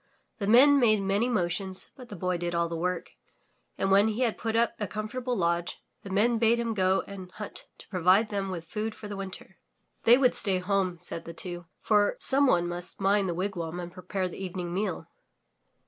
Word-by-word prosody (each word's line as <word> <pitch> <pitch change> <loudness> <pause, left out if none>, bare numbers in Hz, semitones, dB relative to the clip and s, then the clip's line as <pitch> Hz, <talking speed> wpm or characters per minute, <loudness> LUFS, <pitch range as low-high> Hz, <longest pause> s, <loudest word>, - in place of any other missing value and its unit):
The 200 - -2
Men 275 +6 +7
made 215 -4 +4
many 200 +5 +1
motions, 185 -2 -2
but 250 -3 -12
the 205 - -7
Boy 180 0 -1
did 175 0 -2
all 170 0 +1
the 165 - -4
work, 180 +1 -2 0.7
and 195 - 0
when 200 +2 +6
he 220 +3 -2
had 235 -4 +2
put 225 -1 -3
up 235 0 +3
a 210 - -2
comfortable 240 +5 -3
lodge, 170 -1 0 0.2
the 200 - -9
Men 225 +4 +2
bade 230 +1 +4
him 235 -1 -1
go 190 -1 +2
and 190 -2 -9
hunt 210 - -7
to - - -15
provide 185 +3 +3
them 200 -2 -2
with 170 -3 -5
food 215 +5 -4
for 210 - -9
the 205 - -5
winter. 195 -1 -8 0.5
They 235 +2 +8
would 255 -2 +4
stay 195 -3 0
home 185 -1 0
said 165 -1 -6
the 170 - -7
two, 175 -2 -5
for 205 -1 +3
some 280 +1 +3
one 175 -7 +3
must 175 +1 -5
mind 195 0 +2
the 170 - -2
wigwam 175 -2 -3
and 175 -1 -7
prepare 185 +1 -3
the 180 - -7
eve 185 -1 -6
ning 175 -2 -4
meal. 190 -1 -2
195 Hz, 210 wpm, -28 LUFS, 180-220 Hz, 0.7 s, They